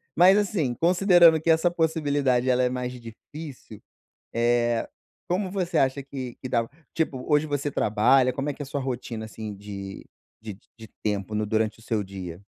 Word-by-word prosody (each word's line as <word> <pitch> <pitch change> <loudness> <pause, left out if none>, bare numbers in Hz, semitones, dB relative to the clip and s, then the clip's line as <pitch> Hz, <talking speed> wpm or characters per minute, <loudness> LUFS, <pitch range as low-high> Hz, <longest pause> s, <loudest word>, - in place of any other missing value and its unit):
Mas, 185 +4 +7
assim, 180 -11 0
considerando 175 - +5
que 165 - -1
essa 160 +2 +4
possibilidade 145 -6 +1
ela 125 0 +3
é 125 - +2
mais 125 0 -3
difícil, 125 0 -10 0.5
eh, 120 0 +1 0.4
como 185 +2 -1
você 180 -4 -1
acha 135 +1 +1
que 130 -3 -7
que 130 - -5
dá 115 -2 +1 0.3
tipo, 140 -6 -2
hoje 150 +1 +3
você 145 0 -2
trabalha, 125 +5 +3
como 140 +3 -2
é - - -2
que - - -10
é - - -2
a - - -8
sua 140 0 -3
rotina, 120 -3 -4
assim, 110 -2 -7
de 100 -1 -8 0.4
de 105 -3 -8 0.2
de 110 -1 -11 0.2
tempo 105 -1 -2
no 105 0 0
durante 110 +1 0
o - - -17
seu 110 -2 -1
dia? 95 -3 -8
130 Hz, 180 wpm, -25 LUFS, 110-155 Hz, 0.5 s, Mas